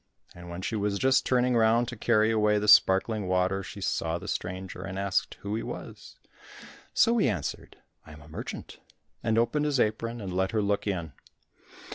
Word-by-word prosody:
And 90 0 -11
when 85 +2 -7
she 110 - -2
was 100 -1 -1
just 130 +4 +2
turning 125 -1 +2
round 115 +1 +3
to 120 - -6
carry 110 0 +2
away 105 -1 +3
the 105 0 -1
sparkling 100 +1 +5
water 95 +1 +1
she - - -9
saw 80 0 -1
the 95 +4 -9
stranger, 95 0 -5
and 95 0 -6
asked 100 -1 -1
who 100 +1 -4
he 110 - -1
was. - - -9 0.7
So 235 0 +3
he 165 - +3
answered, 105 - -5 0.3
"I 75 - -13
am 75 - -13
a - - -16
merchant," 80 - -8 0.4
and 115 0 0
opened 120 +6 +1
his 145 -3 +1
apron, 115 +2 0
and 95 -4 -5
let 95 +2 0
her 110 - +2
look 100 +1 -1
in. 85 -7 -3
105 Hz, 190 wpm, -28 LUFS, 95-115 Hz, 0.7 s, sparkling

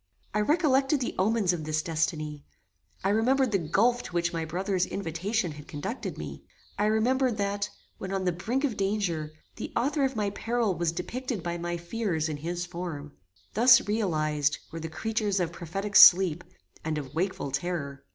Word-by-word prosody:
I 210 - +1
recollected 280 +1 +3
the 250 - -2
omens 200 -2 +2
of 165 -3 -4
this 155 0 -1
destiny; 155 -2 -2 0.6
I 195 - +2
remembered 250 +4 +3
the 195 - +2
gulf 225 +10 +2
to - - -10
which 170 0 0
my 165 -1 -2
brother's 185 +3 -1
invitation 185 +2 -2
had 150 0 -11
conducted 150 - -5
me; - - -7 0.3
I 205 - +1
remembered 235 +3 +2
that, 200 0 -1 0.3
when 190 - -5
on 195 -1 -1
the 180 - +3
brink 230 - -2
of 265 -7 0
danger, 195 -6 -1 0.3
the - - -5
author 280 +4 +1
of 270 -1 0
my 205 -2 0
peril 230 0 0
was 170 -1 0
depicted 215 +4 -4
by 175 0 -3
my 175 0 -2
fears 170 -3 -2
in 150 - -3
his 175 +4 -3
form: 170 -5 -6 0.4
Thus 240 +1 +6
realized, 155 -8 +1
were 165 - -5
the 160 0 -5
creatures 210 +3 -1
of 170 -2 0
prophetic 195 +5 -5
sleep, 175 -2 +8 0.4
and 155 -1 -2
of 140 -3 -6
wakeful 175 -4 -2
terror! 140 -2 -3
185 Hz, 175 wpm, -28 LUFS, 160-220 Hz, 0.6 s, sleep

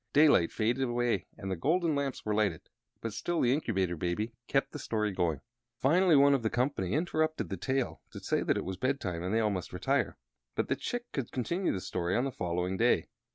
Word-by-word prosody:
Daylight 145 - +5
faded 120 +4 +1
away 120 -6 0
and 95 -3 -5
the - - 0
golden 165 - +1
lamps 140 -2 -2
were 105 - 0
lighted, 100 -6 0 0.3
but 115 -2 -4
still 175 +9 -1
the 125 0 +4
Incubator 95 - 0
Baby 90 +8 -2
kept 135 0 +1
the - - -6
story 105 -2 -1
going. 85 -5 0 0.4
Finally 170 +6 +4
one 140 0 +6
of 135 - +2
the 110 - 0
company 120 -7 0
interrupted 155 -1 0
the - - -2
tale 135 -1 -1
to - - -8
say - - 0
that - - +1
it - - -3
was 95 0 -4
bedtime 105 -9 -1
and 90 +2 -2
they 110 0 +2
must 95 -4 -3
all - - -7
retire, - - 0 0.4
but - - -1
that - - 0
Chick 245 0 -3
should 135 -5 -3
continue 170 +9 -1
the 95 - -2
story 90 0 -1
on 120 - +2
the 135 - -2
following 90 -2 -2
day. 115 -8 +2
115 Hz, 215 wpm, -31 LUFS, 95-140 Hz, 0.4 s, one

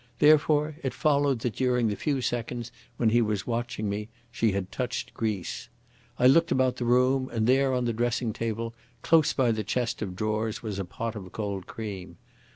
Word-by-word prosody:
Therefore 150 +1 +4
it 130 - -3
followed 140 -4 +2
that 115 -4 -2
during 125 -2 +2
the 105 - -1
few 140 +3 -1
seconds 120 0 -3 0.3
when 115 - +3
he 120 +1 +4
was 105 -3 -1
watching 120 -2 -2
me 105 +2 -3 0.2
she 115 -1 +1
had 95 -1 -3
touched 125 -2 -3
grease. 105 -5 -3 0.5
I - - +2
looked 165 +6 +5
about 130 -1 +2
the 120 - -2
room, 130 +2 +3
and 110 -2 0
there 135 +2 +3
on 125 -1 0
the 120 - 0
dressing 120 0 0
table 115 +1 -3 0.3
close 160 -2 +4
by 125 -3 +2
the 110 -1 -1
chest 120 +2 -2
of 95 -4 -4
drawers 110 +2 -2
was 105 -3 -4
a 95 - -2
pot 115 +5 -5
of 95 -4 -8
cold 100 -4 -4
cream. 95 -6 -7
115 Hz, 190 wpm, -27 LUFS, 110-130 Hz, 0.5 s, looked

